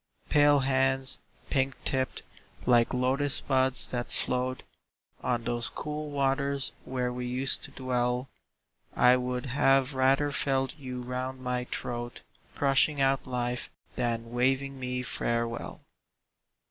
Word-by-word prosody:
Pale 145 -1 +5
hands, 135 0 +2 0.3
pink 135 -1 +1
tipped, 130 -1 -1 0.4
like 120 -2 +4
Lotus 135 +3 +1
buds 130 -2 +1
that 120 -1 -3
float 125 +1 +1 0.6
On 120 -1 0
those 120 0 -1
cool 150 0 -5
waters 140 0 0
where 125 -1 -2
we 125 0 -4
used 130 +2 +2
to - - -9
dwell, 125 0 -1 0.7
I 125 0 +6
would 125 0 -2
have 135 +1 +3
rather 135 +2 +3
felt 135 -2 0
you 130 -4 -6
round 130 +1 -4
my 125 -1 -2
throat, 120 -1 -4 0.3
Crushing 140 +1 +3
out 135 -1 +2
life, 125 -1 -2 0.3
than 115 -1 -2
waving 135 +2 0
me 125 0 -3
farewell! 115 -1 -2
130 Hz, 120 wpm, -29 LUFS, 125-135 Hz, 0.7 s, I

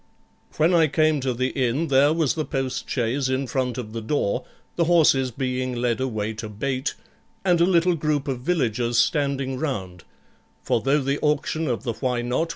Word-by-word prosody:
When 160 +4 +3
I 165 -2 +5
came 155 0 +2
to 130 0 0
the 130 +2 -1
inn, 135 +5 -1
there 140 +2 +5
was 160 -4 +1
the 155 - -2
postchaise 130 -2 -2
in 130 +1 0
front 125 -1 -2
of 110 -3 -6
the 115 - -4
door, 110 -2 -1 0.3
the 170 - +2
horses 155 -6 +4
being 130 0 -2
led 120 0 0
away 110 -4 -2
to 110 0 -7
bait, 130 +6 -2 0.5
and 175 -2 +3
a - - +6
little 180 -1 +3
group 150 -3 -1
of 130 -3 -2
villagers 125 -6 0
standing 135 -1 +1
round; 95 - -4 0.6
for 115 - +1
though 140 +4 +2
the 140 +2 -1
auction 155 +1 0
of 120 -3 -2
the 120 -3 -2
Why 125 0 -2
Not? 130 +7 -1
130 Hz, 180 wpm, -24 LUFS, 120-150 Hz, 0.6 s, a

